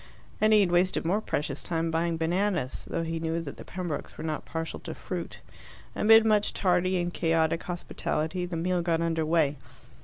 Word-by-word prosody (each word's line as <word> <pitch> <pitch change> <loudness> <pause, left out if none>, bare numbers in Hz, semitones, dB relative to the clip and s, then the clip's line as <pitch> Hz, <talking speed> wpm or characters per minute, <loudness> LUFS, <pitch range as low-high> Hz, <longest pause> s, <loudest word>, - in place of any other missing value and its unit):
And 215 0 +5
he 215 -1 +7
had 185 -3 +2
wasted 175 0 +2
more 195 +6 +1
precious 145 -7 -2
time 165 -1 -1
buying 165 0 0
bananas, 170 -3 -1
though 165 - -1
he 165 0 -3
knew 165 +1 -1
that 145 -4 -7
the - - -9
Pembrokes 175 -5 -5
were - - -6
not 155 -2 -3
partial 165 0 -4
to - - -7
fruit. - - -6 0.5
Amid 225 +1 +6
much 210 -1 +2
tardy 185 0 +2
and 175 0 -1
chaotic 165 0 +1
hospitality 175 0 -3
the 175 -2 -4
meal 180 +2 0
got 165 -1 +1
under 165 -2 0
way. 155 -3 +2
170 Hz, 185 wpm, -28 LUFS, 160-185 Hz, 0.5 s, he